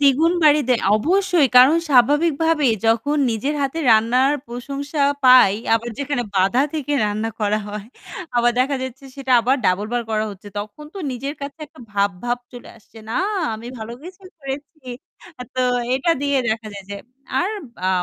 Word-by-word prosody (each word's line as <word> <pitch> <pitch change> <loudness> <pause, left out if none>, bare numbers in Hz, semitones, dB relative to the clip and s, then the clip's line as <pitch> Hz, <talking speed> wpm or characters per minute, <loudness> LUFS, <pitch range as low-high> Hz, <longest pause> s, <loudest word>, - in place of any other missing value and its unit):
দ্বিগুণ 290 +4 +4
বাড়ি 300 0 +6
দেয় 245 -2 +2
অবশ্যই, 345 - +2
কারণ 265 +6 +7
স্বাভাবিকভাবে 295 +3 +3 0.2
যখন 235 +7 +1
নিজের 250 +7 -2
হাতে 275 +4 -2
রান্নার 245 +5 +4 0.2
প্রশংসা 280 +4 -4 0.2
পাই, 250 -6 +7 0.2
আবার 230 +1 -2
যেখানে 280 -2 -2
বাঁধা 195 +8 +3
থেকে 295 -2 -3
রান্না 215 +2 -2
করা 210 0 +1
হয়, 210 0 -7 0.5
আবার 240 0 +3
দেখা 275 +2 +1
যাচ্ছে 260 +1 -7
সেটা 270 -2 -2
আবার 255 +4 +2
double 190 +3 +1
বার 245 - 0
করা 215 0 0
হচ্ছে। 205 +1 -11
তখন 210 +9 -8
তো 395 - -7
নিজের 275 +4 -5
কাছে 280 +3 -7
একটা 280 - -18
ভাব 200 0 +2
ভাব 245 0 -1
চলে 245 -1 -11
আসছে। 225 +1 -18
না - - -2 0.4
আমি 225 +2 -9
ভালো 220 +1 -7
কিছু 365 +3 -12 0.2
করেছি। 280 0 -8 0.5
আ - - -3
তো 255 - -1 0.3
এটা 270 +6 +1
দিয়ে 285 -1 +1
দেখা 220 0 -2
যায় 200 -1 -9
যে 200 - -4 0.4
আর 370 - 0 0.3
বা 185 - -2
255 Hz, 170 wpm, -20 LUFS, 225-290 Hz, 0.5 s, কারণ